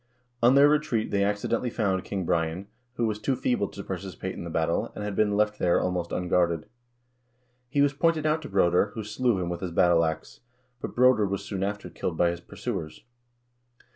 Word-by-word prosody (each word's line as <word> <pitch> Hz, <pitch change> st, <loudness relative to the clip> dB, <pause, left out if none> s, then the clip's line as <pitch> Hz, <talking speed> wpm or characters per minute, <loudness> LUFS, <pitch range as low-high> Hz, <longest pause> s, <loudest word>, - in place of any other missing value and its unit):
On 120 Hz, +3 st, +5 dB
their 140 Hz, +1 st, +7 dB
retreat 150 Hz, -7 st, +1 dB
they 100 Hz, -1 st, +2 dB
accidentally 105 Hz, +4 st, 0 dB
found 95 Hz, -5 st, 0 dB
King 95 Hz, -2 st, -3 dB
Brian, 80 Hz, +3 st, -1 dB, 0.3 s
who 120 Hz, -, 0 dB
was 105 Hz, -1 st, -2 dB
too 135 Hz, +4 st, 0 dB
feeble 125 Hz, -5 st, 0 dB
to 100 Hz, -, -9 dB
participate 95 Hz, -1 st, -5 dB
in -, -, -7 dB
the 85 Hz, -, -6 dB
battle, 80 Hz, 0 st, 0 dB
and 105 Hz, -, -5 dB
had 105 Hz, -1 st, -3 dB
been 105 Hz, -1 st, +2 dB
left 105 Hz, 0 st, +1 dB
there 85 Hz, -1 st, +3 dB
almost 90 Hz, -2 st, -2 dB
unguarded. 85 Hz, -2 st, +1 dB, 1.0 s
He 140 Hz, +1 st, +1 dB
was 140 Hz, -1 st, +2 dB
pointed 160 Hz, +1 st, +1 dB
out 155 Hz, +1 st, +1 dB
to -, -, -8 dB
Broder, 90 Hz, -1 st, +3 dB
who 110 Hz, -, -4 dB
slew 110 Hz, 0 st, 0 dB
him 90 Hz, -, -2 dB
with 85 Hz, 0 st, -4 dB
his 95 Hz, -, -3 dB
battle 85 Hz, 0 st, +4 dB
ax; 80 Hz, -1 st, -4 dB, 0.4 s
but -, -, -6 dB
Broder 125 Hz, -4 st, +4 dB
was 100 Hz, 0 st, -3 dB
soon 95 Hz, -2 st, -4 dB
after 100 Hz, -1 st, -3 dB
killed 85 Hz, -1 st, -4 dB
by 85 Hz, -1 st, +3 dB
his 85 Hz, 0 st, -7 dB
pursuers. 80 Hz, -2 st, -6 dB
100 Hz, 200 wpm, -27 LUFS, 90-115 Hz, 1.0 s, their